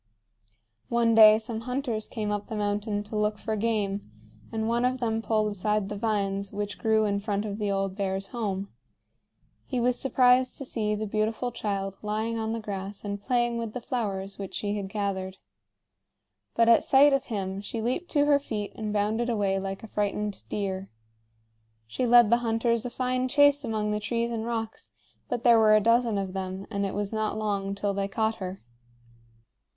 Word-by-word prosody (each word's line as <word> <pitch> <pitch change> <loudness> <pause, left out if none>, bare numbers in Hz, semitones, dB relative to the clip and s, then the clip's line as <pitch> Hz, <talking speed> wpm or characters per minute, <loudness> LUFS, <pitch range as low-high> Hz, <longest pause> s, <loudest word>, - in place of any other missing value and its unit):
One 235 -1 +3
day 215 -1 +9
some 225 0 -4
hunters 250 -3 -2
came 215 -3 -3
up 205 0 -3
the 225 - -5
mountain 205 0 -1
to 210 +1 -8
look 210 0 +1
for 220 +1 -3
game, 205 - -1 0.4
and 220 0 -2
one 235 +1 +1
of 255 +1 +1
them 225 -2 0
pulled 215 -1 +1
aside 205 0 -1
the 205 - -4
vines 200 -2 -1
which 205 0 -4
grew 220 -1 +3
in 200 -1 0
front 205 0 -2
of 205 0 -4
the 205 -1 -1
old 195 -1 -1
bear's 195 -1 -2
home. 200 -4 -3 1.0
He 255 - -1
was 245 +1 +2
surprised 255 -1 +3
to 275 - -5
see 210 -4 -1
the 215 +1 -3
beautiful 220 +3 -1
child 195 -4 -3
lying 220 +2 -2
on 220 0 -2
the 230 - -2
grass 200 -1 -6
and 200 0 -4
playing 240 0 +1
with 225 -2 -4
the - - -3
flowers 200 -6 -3
which 195 -2 -6
she 205 0 -1
had 200 -2 -4
gathered. 195 -2 -3 1.2
But 230 0 +4
at 230 - +6
sight 280 +1 +6
of 275 0 +1
him 195 -3 -3
she 225 +3 -5
leaped 250 +10 -2
to 290 -2 +4
her 290 -1 +4
feet 215 -7 -4
and 215 -1 -4
bounded 215 +3 0
away 200 -4 +1
like 195 +1 -5
a - - -7
frightened 210 0 -2
deer. 195 -2 -3 1.0
She 180 - -2
led 240 -2 +7
the 235 - +6
hunters 230 0 0
a - - -4
fine 255 +1 -1
chase 285 +1 +5
among 215 -3 -1
the 210 - 0
trees 230 +2 -1
and 225 -1 -3
rocks; 225 -2 -4 0.4
but 235 - -2
there 235 -2 +6
were 215 -1 +6
a - - +6
dozen 230 0 +3
of 195 -2 -3
them, 190 0 -4
and 200 -1 -1
it 190 - -5
was 205 +1 -2
not 215 0 -1
long 200 -2 -1
till 200 0 -1
they 195 0 -1
caught 220 +2 -1
her. 185 0 -6
215 Hz, 190 wpm, -27 LUFS, 200-235 Hz, 1.2 s, day